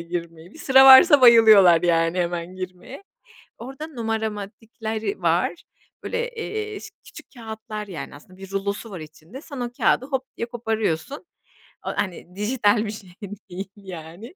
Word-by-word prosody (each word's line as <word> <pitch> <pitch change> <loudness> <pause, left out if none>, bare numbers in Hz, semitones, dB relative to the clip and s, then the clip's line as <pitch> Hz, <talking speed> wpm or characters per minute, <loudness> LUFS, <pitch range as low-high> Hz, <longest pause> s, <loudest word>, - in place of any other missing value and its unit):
girmeyi. 170 0 -7
Bir - - -14
sıra 265 -3 +5
varsa 275 +3 +9
bayılıyorlar 215 -8 +7
yani 165 0 +1
hemen 175 +1 -3
girmeye. 185 - -9 0.6
Orada 270 +6 -8
numaramatikleri 220 - -5
var. 170 +1 +1 0.5
Böyle, 475 +1 -3
eee, 430 -2 -5
ş - - -11
küçük - - -13
kağıtlar, 220 -2 -8
yani, 170 -5 -8
aslında 185 +6 -17
bir 195 0 -11
rulosu 200 +3 -4
var 185 - -7
içinde. 155 - -12
Sen 285 -5 -9
o 240 -1 -4
kağıdı 255 - +2
hop 265 -2 -3
diye 235 - -3
koparıyorsun. 225 - -3 0.6
O, - - 0
hani, 180 -2 -4
dijital 210 0 +1
bir 210 - -4
şey 210 -4 -11 0.4
değil 195 +2 -6
yani. 190 - -11
210 Hz, 145 wpm, -23 LUFS, 180-245 Hz, 0.6 s, varsa